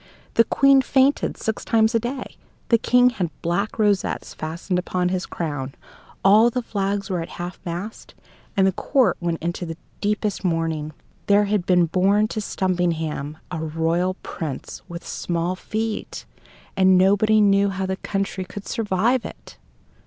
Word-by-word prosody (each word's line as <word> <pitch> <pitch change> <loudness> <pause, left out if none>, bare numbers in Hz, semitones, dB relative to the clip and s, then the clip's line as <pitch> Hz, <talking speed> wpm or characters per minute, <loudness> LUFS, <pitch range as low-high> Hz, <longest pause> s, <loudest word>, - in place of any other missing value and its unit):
The 230 - +5
Queen 275 +3 +5
fainted 270 +1 +2
six 220 -1 -3
times 220 0 +3
a 230 - +3
day; 250 +3 -5 0.3
the 230 - +5
King 250 +2 +4
had 185 -8 -2
black 195 +5 -1
rosettes 205 -3 0
fastened 170 +4 -3
upon 180 0 -1
his 180 0 -2
crown; 145 -5 -4 0.5
all 215 +4 +7
the 250 +1 -3
flags 200 -2 -2
were 180 -2 -1
at 165 - -6
half 175 +1 -6
mast; 180 +6 -6 0.4
and 190 - +5
the 190 - +4
court 260 +7 +2
went 170 -1 -1
into 175 +1 -2
the 165 -2 -5 0.2
deepest 210 -1 -1
mourning. 165 -3 -1 0.4
There 205 +1 +5
had 200 -3 -1
been 180 -2 +4
born 195 +5 +2
to 220 - -3
Stumpinghame 165 -7 -1
a 175 - -3
royal 165 +4 0
prince 155 -6 -6
with 170 0 -8
small 175 +1 -2
feet, 220 +3 -4 0.5
and 190 -1 +5
nobody 205 +3 +4
knew 200 -1 +4
how 190 0 -2
the 190 0 -2
country 195 -1 -3
could 200 +2 -9
survive 225 +2 +1
it! - - -11
190 Hz, 155 wpm, -23 LUFS, 175-215 Hz, 0.5 s, all